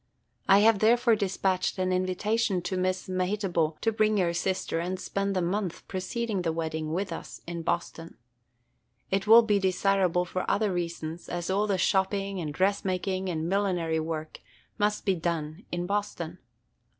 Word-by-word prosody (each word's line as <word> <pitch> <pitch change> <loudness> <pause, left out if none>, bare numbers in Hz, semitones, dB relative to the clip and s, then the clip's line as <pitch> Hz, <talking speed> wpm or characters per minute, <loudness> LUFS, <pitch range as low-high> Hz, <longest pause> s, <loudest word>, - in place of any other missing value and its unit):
I 195 +1 +7
have 220 -1 +5
therefore 235 +2 +4
despatched 190 -2 0
an 185 0 0
invitation 185 +1 0
to 185 - -2
Miss 185 0 -1
Mehitable 185 -4 0
to 225 - +2
bring 215 -1 +2
your 175 -3 +2
sister 180 -1 -1
and 180 +2 -3
spend 200 +1 -2
the 185 - +1
month 185 0 -2
preceding 200 +2 -2
the 165 -2 0
wedding 160 -1 -3
with 180 +1 -2
us - - -8
in 170 0 -5
Boston. 165 0 -3 0.9
It 195 +1 0
will 230 +2 +9
be 210 -2 +2
desirable 185 -1 +2
for 185 +1 -3
other 210 -2 +1
reasons, 170 -1 -4
as 175 +1 -3
all 205 +2 +1
the 195 -2 +1
shopping 195 0 +1
and 155 -3 -3
dressmaking 190 +1 0
and 160 -2 -2
millinery 180 -4 0
work 155 -1 -4 0.4
must 210 0 +1
be 195 - +3
done 165 0 -3
in 175 0 -2
Boston. 180 -4 -3
185 Hz, 160 wpm, -28 LUFS, 170-200 Hz, 0.9 s, will